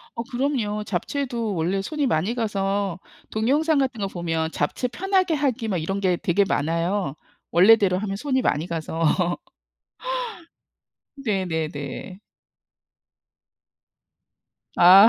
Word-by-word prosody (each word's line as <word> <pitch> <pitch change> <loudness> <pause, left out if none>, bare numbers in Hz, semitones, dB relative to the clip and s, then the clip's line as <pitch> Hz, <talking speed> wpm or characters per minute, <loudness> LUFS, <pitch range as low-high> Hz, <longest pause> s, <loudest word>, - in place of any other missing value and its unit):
어 230 - -2
그럼요. 240 -5 -1
잡채도 230 +2 -2
원래 180 +4 0
손이 295 +5 -1
많이 195 +2 +1
가서 200 -5 -1 0.3
동영상 285 +8 +2
같은 260 -5 0
거 195 - 0
보면 165 -3 -2
'잡채 250 - -1
편하게 375 +2 +1
하기.' 260 -6 0
막 195 - 0
이런 195 +5 -2
게 185 -2 +2
되게 185 +4 +2
많아요. 165 +1 0 0.4
원래대로 190 0 +6
하면 195 0 -3
손이 260 +3 0
많이 150 +3 +1
가서. 165 -1 -2 2.2
네네네. 165 - -2 2.6
아. 190 +5 +9
200 Hz, 220 characters per minute, -24 LUFS, 175-245 Hz, 2.6 s, 아